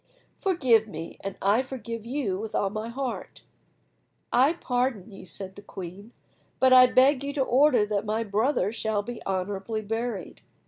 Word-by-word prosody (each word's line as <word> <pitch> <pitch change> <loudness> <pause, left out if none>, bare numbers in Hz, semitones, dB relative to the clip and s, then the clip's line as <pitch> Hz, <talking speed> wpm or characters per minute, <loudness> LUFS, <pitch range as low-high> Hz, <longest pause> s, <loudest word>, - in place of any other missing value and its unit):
Forgive 260 - +3
me, 165 -4 -7
and 195 -1 -5
I 205 +5 +4
forgive 230 -4 -7
you 240 -8 -2
with 220 0 -5
all 195 - +1
my 215 +2 -4
heart." 260 +1 -5 0.9
"I 270 +6 +5
pardon 245 - -2
you," 195 -1 -11
said 190 +2 -6
the 205 - -10
queen, 195 +2 -9 0.5
"but 260 0 +5
I 255 0 +9
beg 260 +2 +4
you 285 0 -3
to 275 - +1
order 260 -3 +4
that 205 -1 -1
my 220 +2 0
brother 210 0 +1
shall 220 -2 -1
be 240 +2 -7
honourably 195 +3 -2
buried." 225 -3 -4
225 Hz, 165 wpm, -27 LUFS, 200-255 Hz, 0.9 s, I